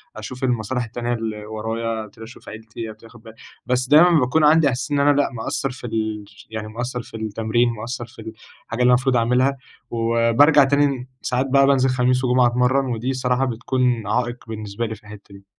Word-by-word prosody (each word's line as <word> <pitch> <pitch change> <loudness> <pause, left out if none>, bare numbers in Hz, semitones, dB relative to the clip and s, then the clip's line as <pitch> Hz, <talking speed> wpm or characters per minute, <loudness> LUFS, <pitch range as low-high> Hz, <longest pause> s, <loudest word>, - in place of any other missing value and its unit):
أشوف 125 +5 -8
المصالح 125 0 -1
التانية 120 +1 -3
اللي 110 -2 -4
ورايا، 110 +1 -4
أبتدي 110 +2 -14
أشوف 115 +3 -12
عيلتي، 110 +1 -8
أبتدي 110 +1 -13
آخد 120 -1 -17
بال 110 -1 -12 0.3
بس 125 0 0
دايمًا 165 +2 +6
باكون 135 +5 +1
عندي 150 -1 +5
إحساس 130 +4 -4
إن 145 - +1
أنا 145 +1 +4
لأ، - - -1
مقصر 125 +3 -3
في 125 -1 -8
ال 110 -2 -3 0.2
يعني 110 -1 -5
مقصر 120 +2 -4
في 115 - -10
التمرين، 110 +2 0
مقصر 120 +2 -6
في 115 -1 -14 0.4
الحاجة 115 +2 -4
اللي 125 - +5
المفروض 125 +1 +3
أعملها، 125 +4 +2 0.3
وبارجع 115 +6 +4
تاني، 135 -2 +1
ساعات 125 +1 -1
بقى 135 0 +4
بانزل 130 -1 +3
خميس 125 0 +1
وجمعة 125 0 +3
أتمرن، 125 +3 +2
ودي 120 0 -3
الصراحة 125 0 0
بتكون 120 -2 -1
عائق 120 +3 -1
بالنسبة 110 0 -5
لي 110 0 -5
في 110 - -20
الحتة 105 -1 -13
دي. 100 0 -16
120 Hz, 190 wpm, -21 LUFS, 110-130 Hz, 0.4 s, دايمًا